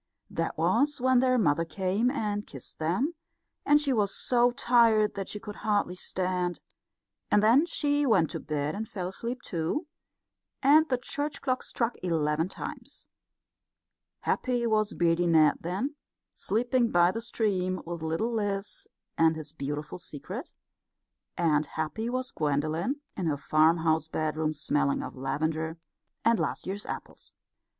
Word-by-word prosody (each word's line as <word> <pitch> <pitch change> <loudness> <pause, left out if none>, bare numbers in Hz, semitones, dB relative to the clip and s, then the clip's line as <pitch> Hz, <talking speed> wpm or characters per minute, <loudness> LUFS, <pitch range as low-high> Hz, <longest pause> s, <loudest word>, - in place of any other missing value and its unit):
That - - -2
was 290 0 +2
when 255 0 +4
their 255 0 +3
mother 165 -7 +3
came 190 +7 0
and 210 -6 -2
kissed 135 -4 -10
them, 185 - 0 0.5
and 295 0 +6
she 285 -3 +1
was 205 -4 +2
so 245 -1 +3
tired 235 -4 +4
that 195 -1 -5
she 210 - -5
could 210 0 -8
hardly 205 -4 0
stand; 180 -1 -2 0.7
and 210 - +4
then 255 +10 +5
she 290 -3 +1
went 185 -9 +3
to - - -4
bed 150 -1 -2
and 215 +1 -5
fell 180 -3 -4
asleep 235 +6 -5
too, 170 - -2 0.8
and 310 +4 +6
the 255 - +2
church 285 +4 -4
clock 255 -2 0
struck 235 0 -2
eleven 160 -1 0
times. - - -8 1.1
Happy 245 -2 0
was 215 -1 +1
Beardy 170 0 +2
Ned 155 -3 +5
then, 195 - -2 0.4
sleeping 240 +3 +1
by 175 -1 +4
the 225 - -4
stream, 190 -6 -1
with 170 -1 -5
little 165 +9 -1
Liz 205 -2 -3 0.3
and 160 0 +5
his 155 -1 -7
beautiful 150 +2 -5
secret; 145 -5 -7 0.9
and 155 -3 +2
happy 160 +11 -3
was 255 +1 -2
Gwendolen 155 - -1
in 185 -4 -2
her 145 -2 0
farmhouse 160 +1 +3
bedroom 155 0 -1
smelling 145 -2 0
of - - -7
lavender 155 +5 -2 0.5
and 230 -1 +4
last - - -2
year's 200 +2 -4
apples. - - -8
190 Hz, 145 wpm, -28 LUFS, 160-240 Hz, 1.1 s, and